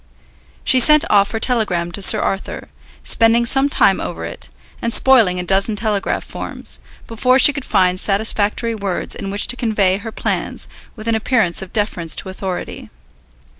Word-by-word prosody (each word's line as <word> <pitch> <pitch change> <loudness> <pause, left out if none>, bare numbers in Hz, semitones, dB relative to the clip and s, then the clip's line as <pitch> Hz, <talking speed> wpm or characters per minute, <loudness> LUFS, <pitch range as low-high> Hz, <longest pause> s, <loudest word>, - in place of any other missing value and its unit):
She 260 - +4
sent 300 +4 +6
off 200 -1 +3
her 225 - -4
telegram 205 -9 0
to 200 - -6
Sir - - +5
Arthur, 195 - -4 0.3
spending 230 +1 +3
some 270 +3 +2
time - - +2
over - - -6
it, - - -6 0.3
and 235 - -2
spoiling 225 -9 +3
a - - -3
dozen 195 +4 +1
telegraph 205 -2 -2
forms, - - -8 0.3
before 250 +3 +1
she 285 +2 +6
could 280 -1 -6
find 185 -1 +1
satisfactory 210 +3 -1
words 200 -4 -2
in 195 - -6
which 200 +1 +1
to - - +2
convey 210 -6 0
her 225 +2 -8
plans - - -4 0.3
with 220 -1 -10
an 230 - +1
appearance 220 -6 +1
of 190 - -9
deference 180 -6 -1
to 190 - -3
authority. 185 -1 -7
215 Hz, 170 wpm, -17 LUFS, 190-235 Hz, 0.3 s, sent